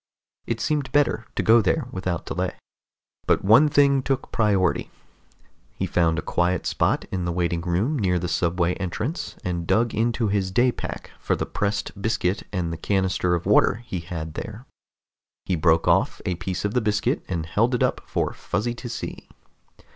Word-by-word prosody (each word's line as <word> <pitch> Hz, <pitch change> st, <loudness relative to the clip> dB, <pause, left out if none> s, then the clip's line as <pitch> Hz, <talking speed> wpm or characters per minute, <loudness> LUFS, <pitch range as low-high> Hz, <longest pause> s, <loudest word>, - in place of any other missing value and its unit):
It 115 Hz, -1 st, -2 dB
seemed 150 Hz, +2 st, -1 dB
better 145 Hz, -6 st, +2 dB
to -, -, 0 dB
go 115 Hz, +1 st, +6 dB
there 125 Hz, +7 st, 0 dB
without 90 Hz, -3 st, -3 dB
delay. -, -, -2 dB, 0.7 s
But -, -, +2 dB
one 115 Hz, +9 st, +7 dB
thing 140 Hz, -1 st, +4 dB
took 135 Hz, 0 st, -2 dB
priority. 100 Hz, -5 st, +1 dB, 0.9 s
He -, -, -2 dB
found 85 Hz, -2 st, +2 dB
a -, -, -2 dB
quiet 90 Hz, +1 st, 0 dB
spot -, -, +1 dB
in 90 Hz, -2 st, -2 dB
the 85 Hz, -, -1 dB
waiting 85 Hz, -1 st, 0 dB
room 95 Hz, -, 0 dB
near 90 Hz, -4 st, +2 dB
the 90 Hz, 0 st, -2 dB
subway 85 Hz, +1 st, +1 dB
entrance 110 Hz, -, -4 dB
and 85 Hz, -2 st, -3 dB
dug 115 Hz, 0 st, +2 dB
into 115 Hz, 0 st, +1 dB
his 100 Hz, -2 st, 0 dB
day 120 Hz, +6 st, +3 dB
pack -, -, -7 dB
for -, -, 0 dB
the -, -, -2 dB
pressed 100 Hz, 0 st, -3 dB
biscuit 100 Hz, -3 st, 0 dB
and 90 Hz, -4 st, -2 dB
the -, -, -5 dB
canister 95 Hz, -1 st, +1 dB
of 85 Hz, -, -4 dB
water 110 Hz, +4 st, +3 dB
he 95 Hz, -, -4 dB
had 80 Hz, -2 st, -6 dB
there. 110 Hz, +8 st, -7 dB, 0.8 s
He 95 Hz, -, 0 dB
broke 80 Hz, 0 st, +3 dB
off -, -, +3 dB
a 90 Hz, -, 0 dB
piece 90 Hz, +3 st, -4 dB
of 105 Hz, -, -1 dB
the 125 Hz, -, +2 dB
biscuit 105 Hz, -1 st, 0 dB
and 85 Hz, -3 st, -2 dB
held 115 Hz, +9 st, +1 dB
it -, -, +1 dB
up -, -, 0 dB
for -, -, -1 dB
Fuzzy 115 Hz, +4 st, -2 dB
to 120 Hz, +1 st, -7 dB
see. -, -, -6 dB
100 Hz, 180 wpm, -24 LUFS, 90-115 Hz, 0.9 s, one